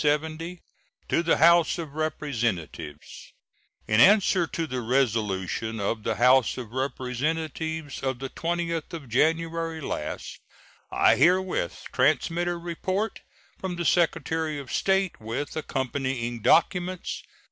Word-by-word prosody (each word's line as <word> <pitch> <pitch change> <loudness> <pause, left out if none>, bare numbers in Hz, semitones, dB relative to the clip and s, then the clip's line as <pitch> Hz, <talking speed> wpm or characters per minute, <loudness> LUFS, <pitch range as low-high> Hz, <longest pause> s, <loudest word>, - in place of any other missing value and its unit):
To 155 +4 -1 0.6
the 170 -1 +2
House 170 +2 +5
of 160 -4 -6
Representatives: 115 - -4 0.5
In 110 0 +3
answer 190 - +5
to 165 - -3
the 130 -4 -3
resolution 110 -3 0
of 105 +3 -1
the 110 +1 -1
House 125 +2 +4
of 120 -4 -7
Representatives 145 +4 -3
of 130 -2 -1
the 135 +1 -5
20th 170 -1 -2
of 155 -5 -7
January 165 +5 0
last, 130 - -5 0.5
I - - +4
herewith 180 - +2
transmit 155 +6 +2
a 175 0 -1
report 185 +5 -3 0.4
from 185 -2 -3
the 175 0 -3
Secretary 160 -2 +1
of 140 -2 -7
State, 190 - +1
with 115 +7 -4
accompanying 130 -5 -2
documents. 180 - +2
155 Hz, 115 wpm, -26 LUFS, 125-170 Hz, 0.6 s, House